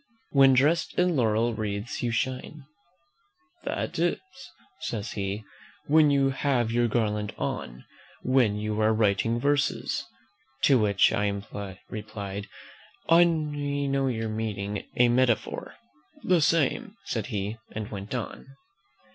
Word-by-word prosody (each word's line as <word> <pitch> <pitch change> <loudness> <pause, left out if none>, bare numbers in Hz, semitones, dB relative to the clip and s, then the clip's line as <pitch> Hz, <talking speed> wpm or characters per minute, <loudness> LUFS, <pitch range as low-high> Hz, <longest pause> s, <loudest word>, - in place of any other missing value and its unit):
"'When 135 -1 +6
dressed 150 +6 +2
in 180 -1 +2
laurel 115 -1 +2
wreaths 105 0 -3
you 120 - 0
shine,' 130 +4 -3 1.0
"That - - -3
is," - - +2 0.6
says 110 -1 -4
he, 100 +1 -3 0.4
"when 155 0 +5
you 140 -1 +3
have 130 -4 0
your 120 0 +2
garland 105 -2 -1
on; 60 +1 -4 0.4
when 125 -5 +3
you 105 +1 -2
are 110 +1 +4
writing 110 +2 +2
verses." 145 +2 0 0.6
To 135 -3 +6
which 100 -3 +3
I 100 -1 -3
replied, 105 -2 -6 0.6
"I 165 +1 +8
know 145 -4 -1
your 115 -3 -2
meaning: 105 -2 -3
a 125 - +6
metaphor!" 120 -1 +1 0.5
"The 180 -3 +3
same," 165 - +1
said 115 -1 -2
he, 105 -2 -3
and 110 -1 -5
went 100 +3 -5
on. 120 +1 -5
115 Hz, 120 wpm, -27 LUFS, 105-140 Hz, 1.0 s, I